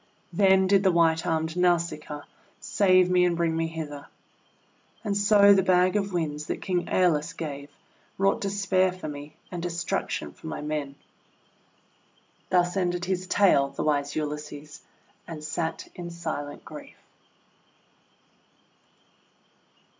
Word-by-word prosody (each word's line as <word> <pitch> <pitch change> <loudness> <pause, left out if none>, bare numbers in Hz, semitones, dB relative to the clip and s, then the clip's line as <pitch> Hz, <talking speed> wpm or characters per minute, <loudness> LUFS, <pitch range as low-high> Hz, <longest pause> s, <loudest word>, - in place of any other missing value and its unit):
Then 190 +1 +4
did 195 +1 +4
the 190 -1 +3
white 165 -1 +2
armed 160 0 -1
Nausicaa 170 -4 0 0.4
save 185 -2 +3
me 180 0 +4
and 175 -1 +1
bring 165 -1 +1
me 165 0 0
hither. 155 -3 -7 1.0
And 205 -3 -1
so 205 0 +6
the 195 - +4
bag 185 +1 +3
of 200 -1 0
Winds 150 -4 -3
that - - -3
King 175 -2 -1
^Eolus 160 -5 +1
gave, 145 -3 -6 0.5
wrought 195 +1 +2
despair 195 -2 +1
for 185 -3 -8
me 145 0 -8 0.2
and 175 -2 -5
destruction 175 0 -3
for - - -12
my 80 - -4
men. 150 -2 -4 1.5
Thus 175 0 +2
ended 180 -1 0
his 185 0 -2
tale, 180 -9 +4
the 140 - -5
wise 145 -1 0
Ulysses, 150 -1 -5 0.5
and 160 -3 -7
sat 160 +1 -3
in 175 -1 -7
silent 160 -4 -6
grief. - - -11
170 Hz, 130 wpm, -26 LUFS, 150-185 Hz, 1.5 s, so